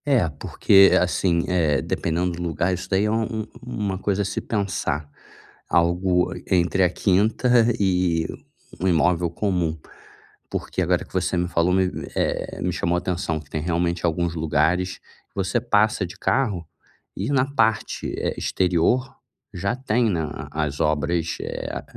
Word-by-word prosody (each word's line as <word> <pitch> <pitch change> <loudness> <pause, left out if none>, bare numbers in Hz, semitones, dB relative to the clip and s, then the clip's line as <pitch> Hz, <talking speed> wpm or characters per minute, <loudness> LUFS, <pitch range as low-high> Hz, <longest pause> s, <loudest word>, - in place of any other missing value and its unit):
É, 130 - +3
porque 95 +6 +4
assim, 90 -1 +1
eh, 80 -6 +2
dependendo 85 +5 -1
do 85 0 -6
lugar 85 +2 0
isso 90 - -5
daí 95 +2 +2
é 105 - +1
um 110 0 -1
um - - -14
uma 105 -6 -3
coisa 100 0 0
a - - -4
se 95 - -3
pensar, 95 -8 -2 0.6
algo 90 +1 +2 0.2
entre 90 +1 +2
a 90 - +4
quinta 110 +6 +3
e 90 -4 +1 0.5
um 95 - 0
imóvel 85 0 +2
comum, 85 -3 -1 0.7
porque - - -2
agora - - +1
que - - -23
você - - 0
me 90 0 0
falou 85 +1 +2
me 95 0 +2
me, - - -6
eh, - - -2
me 90 - +1
chamou 85 0 0
atenção 85 -3 -2
que 75 - -17
tem 75 - -3
realmente 85 +1 -1
alguns 85 0 0
lugares, 80 +3 0 0.3
você 95 +4 0
passa 110 -3 +2
de 90 - -12
carro, 95 - 0 0.5
e 100 +7 -2
na 135 -2 +3
parte, 110 -5 0
eh, - - -1
exterior 95 +8 +1 0.4
já 100 +6 -1
tem, 120 -3 +1
né, 85 -4 0
a 75 -1 -6
a - - +3
as 70 -1 -6
obras, 80 +1 0
eh, - - -5
90 Hz, 160 wpm, -23 LUFS, 85-100 Hz, 0.7 s, porque